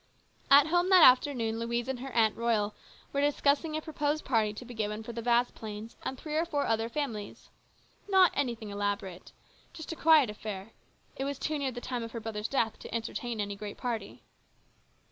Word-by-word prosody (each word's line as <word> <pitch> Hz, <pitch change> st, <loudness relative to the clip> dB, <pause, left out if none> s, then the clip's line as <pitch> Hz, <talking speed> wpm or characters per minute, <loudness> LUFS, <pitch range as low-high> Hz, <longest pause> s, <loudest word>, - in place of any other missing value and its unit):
At 280 Hz, +1 st, +8 dB
home 350 Hz, +3 st, +2 dB
that 370 Hz, -3 st, +8 dB
afternoon 250 Hz, -3 st, +4 dB
Louise 235 Hz, +1 st, -2 dB
and 265 Hz, -2 st, -3 dB
her 265 Hz, +1 st, -6 dB
Aunt 220 Hz, -2 st, +3 dB
Royal 220 Hz, -3 st, 0 dB, 0.4 s
were 280 Hz, -, +1 dB
discussing 290 Hz, +2 st, +1 dB
a 310 Hz, -, -5 dB
proposed 300 Hz, 0 st, -2 dB
party 220 Hz, -5 st, +2 dB
to 215 Hz, +4 st, -9 dB
be 245 Hz, -, -9 dB
given 215 Hz, -1 st, -3 dB
for 235 Hz, -, -7 dB
the 230 Hz, -, -4 dB
Vasplaines 230 Hz, -2 st, -1 dB
and 265 Hz, -, -4 dB
three 305 Hz, +3 st, -5 dB
or 320 Hz, -, +3 dB
four 295 Hz, -4 st, -1 dB
other 225 Hz, 0 st, 0 dB
families. 230 Hz, -7 st, -5 dB, 0.6 s
Not 380 Hz, -2 st, +6 dB
anything 235 Hz, -6 st, -2 dB
elaborate. 200 Hz, -3 st, -3 dB, 0.4 s
Just 320 Hz, -1 st, -7 dB
a -, -, -4 dB
quiet 310 Hz, -8 st, +5 dB
affair; 210 Hz, 0 st, -7 dB, 0.5 s
it 270 Hz, -, -2 dB
was 280 Hz, 0 st, -3 dB
too 305 Hz, +1 st, -2 dB
near 270 Hz, -2 st, -1 dB
the 245 Hz, 0 st, -7 dB
time 250 Hz, -1 st, -3 dB
of 230 Hz, 0 st, -7 dB
her 230 Hz, -, -4 dB
brother's 215 Hz, -1 st, -4 dB
death 230 Hz, -5 st, 0 dB
to -, -, -10 dB
entertain 230 Hz, 0 st, -3 dB
any 205 Hz, -1 st, -2 dB
great 205 Hz, 0 st, -7 dB
party. 230 Hz, -5 st, -4 dB
235 Hz, 190 wpm, -30 LUFS, 220-285 Hz, 0.6 s, At